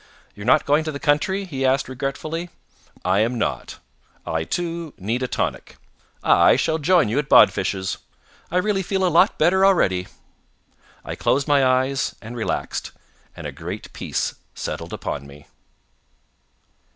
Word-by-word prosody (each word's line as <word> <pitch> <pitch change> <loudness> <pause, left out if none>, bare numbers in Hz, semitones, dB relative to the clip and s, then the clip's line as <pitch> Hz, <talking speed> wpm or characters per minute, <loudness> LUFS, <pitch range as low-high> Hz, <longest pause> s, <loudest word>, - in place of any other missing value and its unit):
"You're 100 +2 -9
not 155 +4 +4
going 145 +2 +3
to 155 - -2
the 140 - -6
country?" 190 +8 +1
he 135 -7 -4
asked 130 +1 +2
regretfully. 145 +6 -4 0.6
"I 95 +2 +3
am 115 +3 +1
not. - - -3 0.5
I, 80 0 -1
too, 170 - -4
need 110 +7 -2
a 130 - 0
tonic. - - -3 0.5
I - - +5
shall 160 0 0
join 175 +1 +4
you 115 +7 0
at 150 -1 -3
Bodfish's. 95 -1 +4 0.5
I 180 - 0
really 195 +1 +1
feel 190 0 0
a - - +3
lot 170 - +4
better 180 +4 +3
already." 95 - +3 1.0
I - - -4
closed 140 +1 0
my 145 -2 +4
eyes, 130 +1 +1
and 115 +2 -9
relaxed, 115 - -3 0.4
and - - -8
a - - -4
great - - -7
peace - - -2 0.2
settled - - -5
upon 70 -1 -5
me. 70 +1 -14
140 Hz, 150 wpm, -22 LUFS, 115-170 Hz, 1.0 s, I